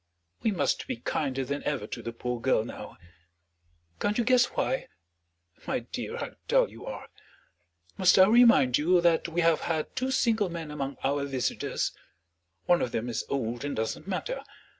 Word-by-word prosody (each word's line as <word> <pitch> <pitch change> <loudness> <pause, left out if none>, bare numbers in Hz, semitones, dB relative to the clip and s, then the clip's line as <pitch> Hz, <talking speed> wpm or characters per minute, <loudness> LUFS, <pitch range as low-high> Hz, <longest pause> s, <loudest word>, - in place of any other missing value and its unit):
We - - +2
must 155 -10 0
be - - -2
kinder 135 +2 -2
than 140 +2 -3
ever 140 -8 -2
to - - -6
the 115 - -5
poor 120 0 -4
girl 120 -4 +2
now; - - -9 1.0
can't 205 +1 0
you 240 - +2
guess 250 +1 +5
why? 265 - -2 0.8
My - - 0
dear, - - -6
how - - -4 0.2
dull - - +3
you - - -11
are! - - -6 0.9
Must 185 -2 +5
I 185 - +9
remind 225 - +6
you 175 +4 +4
that 170 -1 +3
we 170 +1 0
have 165 -1 +4
had 160 -2 -2
two 260 0 -1
single 225 -6 +2
men 165 -3 -6
among 140 -2 -4
our 140 +1 +1
visitors? 135 -3 -1 0.7
One 175 -1 +4
of 120 - -1
them 115 +2 -2
is 120 - -2
old 120 -2 -2
and 145 - -3
doesn't 110 - -3
matter. 480 - -3
150 Hz, 175 wpm, -28 LUFS, 130-195 Hz, 1.0 s, I